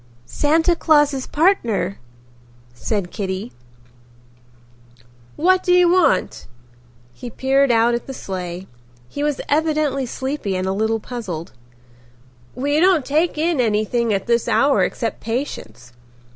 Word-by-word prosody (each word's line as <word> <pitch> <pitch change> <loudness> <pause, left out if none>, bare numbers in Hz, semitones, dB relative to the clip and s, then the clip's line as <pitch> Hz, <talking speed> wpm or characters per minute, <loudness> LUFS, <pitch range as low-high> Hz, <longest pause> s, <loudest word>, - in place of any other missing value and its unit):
"Santa 320 - +1
Claus's 295 -5 +2
partner," 235 - +1 0.7
said 185 - -3
Kitty. 195 +3 -4 1.8
"What 370 +4 +3
do 360 - 0
you 360 -1 +5
want?" 365 -2 +1 0.7
He 245 - -8
peered 270 +3 +1
out 230 +1 +3
at 235 - -3
the 270 - -6
sleigh. 180 -3 -6 0.4
He 285 - -6
was 295 -2 -1
evidently 300 -3 0
sleepy 260 -6 -3
and 185 0 -2
a 190 - 0
little 220 +2 0
puzzled. 200 -9 -6 1.0
"We 290 +3 0
don't 350 -5 +3
take 310 +3 0
in 320 -3 +1
anything 225 +1 0
at 195 -2 -1
this 235 -1 +1
hour 280 0 +3
except 230 -2 -3
patients." 125 - -5
255 Hz, 120 wpm, -20 LUFS, 210-300 Hz, 1.8 s, you